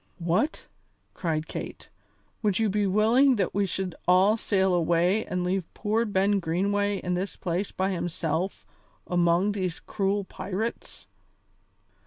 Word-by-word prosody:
"What!" 180 - 0 0.5
cried 160 -3 -2
Kate, - - -7 0.5
"would 205 -4 +1
you 220 -1 +2
be 205 0 +1
willing 230 +7 +4
that 195 -5 -1
we 200 0 +1
should 185 -1 -3
all 185 +4 +5
sail 190 -4 +1
away 175 +4 +2
and 180 0 -2
leave 180 -1 -2
poor 220 +2 0
Ben 200 -1 +2
Greenway 200 +4 0
in 180 -1 -3
this 185 +3 -3
place 180 +3 -2
by 190 +1 -1
himself 175 0 -2 0.4
among 175 +3 +2
these 185 -4 -3
cruel 200 0 -1
pirates?" 200 +4 -5
190 Hz, 135 wpm, -27 LUFS, 180-205 Hz, 0.5 s, all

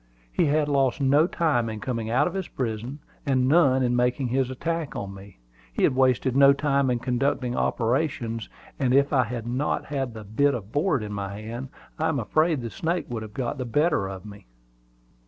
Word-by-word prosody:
He - - +2
had 150 0 +2
lost 135 -3 +1
no 145 +4 +4
time 150 -11 +1
in 110 -1 -5
coming 115 -2 -3
out 130 +6 +3
of 175 - -2
his 190 -3 -3
prison, 120 +2 -4 0.3
and 130 -2 +2
none 135 -4 +4
in 125 0 +1
making 125 +1 +1
his 130 +1 +1
attack 165 +3 -3
on 100 -1 -5
me. 100 0 -13 0.3
He - - -2
had - - +3
wasted 130 -1 +2
no 140 0 +7
time 140 -2 +1
in 125 - +1
conducting 125 0 -1
operations; 115 -2 -1 0.3
and 130 -2 +2
if 140 +2 +3
I 130 -3 +4
had 115 0 -5
not 125 +5 -1
had 135 -5 -3
the 110 - -7
bit 135 +7 +1
of 105 -3 -7
board 145 - +1
in 105 0 -5
my 100 0 -5
hand, 120 +5 -6 0.3
I 160 +1 +1
am 160 - 0
afraid 155 +5 +1
the 115 -1 -5
snake 170 0 -2
would 120 -2 -4
have 110 -1 -9
got 130 +2 -3
the 130 - -2
better 125 - +1
of 95 +1 -8
me. 100 - -12
130 Hz, 205 wpm, -25 LUFS, 115-145 Hz, 0.3 s, no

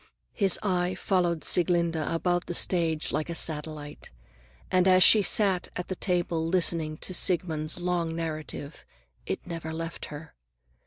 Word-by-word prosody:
His 195 -5 +3
eye 180 -2 0
followed 175 -5 0
Sieglinde 170 -1 +2
about 170 +3 -1
the 175 - -2
stage 165 -4 0
like 155 - -2
a 170 - -4
satellite, 150 -2 -5 0.6
and 185 0 +3
as 185 -1 +6
she 215 - +7
sat 195 -2 +2
at 180 - -5
the 185 - -2
table 175 -3 -1
listening 165 -2 +1
to 185 - -2
Siegmund's 170 -3 +1
long 175 -2 -1
narrative, 155 -2 -6 0.4
it - - -4
never 165 -3 -6
left 165 +1 -5
her. 150 +1 -10
170 Hz, 145 wpm, -27 LUFS, 160-180 Hz, 0.6 s, she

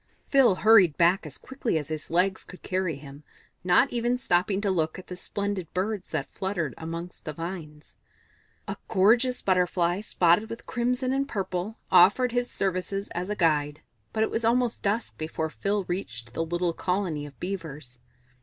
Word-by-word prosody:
Phil 265 -8 +5
hurried 195 -6 +5
back 170 0 +3
as 145 - -9
quickly 260 -9 -2
as 150 -1 -4
his 155 -1 -5
legs 185 +3 +1
could 180 - -13
carry 185 -4 -1
him, 140 +1 -12 0.4
not 180 +10 +4
even 240 +1 +1
stopping 190 -4 +1
to 205 -1 0
look 160 -3 0
at 185 - -9
the 180 - -7
splendid 200 -2 -4
Birds 195 +1 -2
that - - -3
fluttered 185 -8 -2
amongst 165 +2 -7
the 155 - -5
vines. 160 -2 -7 0.7
A - - -4
gorgeous 235 +6 +3
Butterfly, 180 -1 +2
spotted 185 +1 +2
with 230 - -7
crimson 250 +1 0
and 275 +1 0
purple, 195 +1 -3
offered 200 +8 +6
his 245 0 0
services 195 +1 -2
as 180 +3 -4
a 210 - -1
guide, 150 -4 +1 0.3
but 220 - +1
it - - -1
was 230 - -1
almost 240 +1 +1
dusk 210 +3 -2
before 160 0 -3
Phil 200 +3 -1
reached 120 -10 -5
the 165 - -1
little 175 +1 -1
colony 180 -5 -2
of 140 -4 -15
Beavers. 155 -9 -5
185 Hz, 170 wpm, -27 LUFS, 165-215 Hz, 0.7 s, offered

